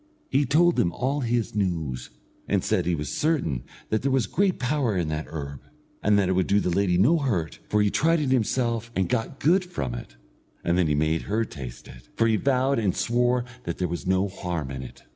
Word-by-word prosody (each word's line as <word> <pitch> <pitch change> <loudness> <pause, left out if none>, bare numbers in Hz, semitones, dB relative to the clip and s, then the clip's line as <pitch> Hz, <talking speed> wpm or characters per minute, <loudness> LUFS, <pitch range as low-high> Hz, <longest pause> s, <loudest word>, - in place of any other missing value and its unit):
He 140 0 +2
told 170 +5 +4
them 85 - +2
all 135 - -1
his 120 -3 -1
news, 80 -11 -2 0.4
and - - +1
said - - +1
that - - 0
he 85 - +2
was 75 -2 -4
certain 140 - 0 0.3
that 110 - +1
there 135 - 0
was 130 -4 +2
great 195 -1 +1
power 125 -5 0
in 85 -3 0
that 75 0 -3
herb, 70 -3 -6 0.4
and 105 -1 +3
that 100 -2 +3
it - - +1
would 95 -1 +1
do 100 - +4
the 90 - 0
lady 90 -1 +2
no 130 - +4
hurt, 100 - -1
for 105 0 +3
he 105 - +2
tried 165 +2 +3
it 140 -4 0
himself 120 -2 0
and 95 -2 +1
got 125 +3 -2
good 180 +5 +4
from 170 - -4
it, - - -8 0.5
and 85 - +1
then 90 -2 +3
he 75 - +1
made 80 +2 +1
her 110 +2 +1
taste 65 - -9
it, - - -14
for 115 - +2
he 110 -1 +3
vowed 130 +2 +2
and 100 -5 0
swore 120 +1 +1 0.2
that 85 - -3
there 90 - 0
was 85 +2 -5
no 95 +1 +2
harm 90 -7 -4
in 65 -1 -5
it. 65 - -11
100 Hz, 230 wpm, -25 LUFS, 80-130 Hz, 0.5 s, told